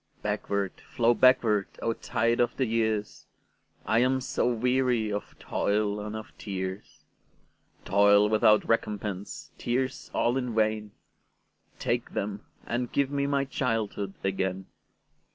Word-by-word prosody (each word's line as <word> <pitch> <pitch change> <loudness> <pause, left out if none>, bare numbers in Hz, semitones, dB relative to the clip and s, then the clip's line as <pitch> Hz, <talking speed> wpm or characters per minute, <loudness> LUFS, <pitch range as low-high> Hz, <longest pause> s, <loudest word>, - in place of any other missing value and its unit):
Backward, 100 -2 -2
flow 120 0 +4
backward, 115 -4 +4
O 115 - 0
tide 115 0 0
of 120 -1 +1
the 130 - +2
years!I 110 0 -3
am 130 +2 +3
so 125 -1 0
weary 125 -2 +1
of 105 - -5
toil 105 0 0
and 105 +1 -5
of 110 0 -8
tears,—Toil 100 +1 -1
without 110 0 +4
recompense, 105 -3 -2
tears 130 +3 -2
all 120 +2 +1
in 125 -3 -2
vain,—Take 110 -1 -4
them, 100 +1 -3 0.2
and 120 0 -2
give 140 -1 +1
me 140 -1 0
my 140 -1 +1
childhood 110 -7 -2
again! 95 -1 -1
110 Hz, 115 wpm, -28 LUFS, 105-125 Hz, 0.2 s, flow